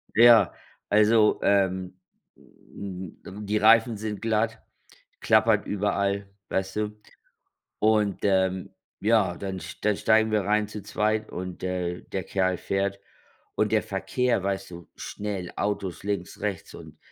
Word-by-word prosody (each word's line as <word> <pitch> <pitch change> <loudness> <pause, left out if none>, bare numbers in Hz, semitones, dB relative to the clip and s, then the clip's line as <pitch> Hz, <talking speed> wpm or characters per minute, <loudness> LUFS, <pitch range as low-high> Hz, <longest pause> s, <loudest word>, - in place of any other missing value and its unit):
Ja, 115 -3 +7 0.4
also, 105 +1 +4
ähm, 95 -2 +1 0.4
hm, 95 -3 -10 0.3
die 105 +1 0
Reifen 115 +1 +5
sind 105 0 -5
glatt, 115 0 0 0.6
klappert 110 -1 +3
überall, 100 -1 -1 0.2
weißt 95 +1 -2
du? 105 0 -3 0.8
Und, 105 -2 +2
ähm, 95 -1 +1 0.3
ja, 105 -4 +2
dann 95 -2 -5
st 95 +6 -10
dann 105 -1 +3
steigen 110 +1 +3
wir 105 -2 +2
rein 105 +1 +1
zu 105 -1 -7
zweit 110 +1 -1
und, 90 0 -6
äh, 90 -1 -3
der 95 -2 -5
Kerl 95 -2 0
fährt. 100 0 -2 0.6
Und - - +1
der - - +3
Verkehr, 125 -5 0
weißt 95 -1 -3
du, 85 -2 -11
schnell, 100 -4 -5
Autos 100 -3 -2
links, 100 -3 -3
rechts 100 -5 -4
und - - -12
100 Hz, 135 wpm, -26 LUFS, 95-105 Hz, 0.8 s, Ja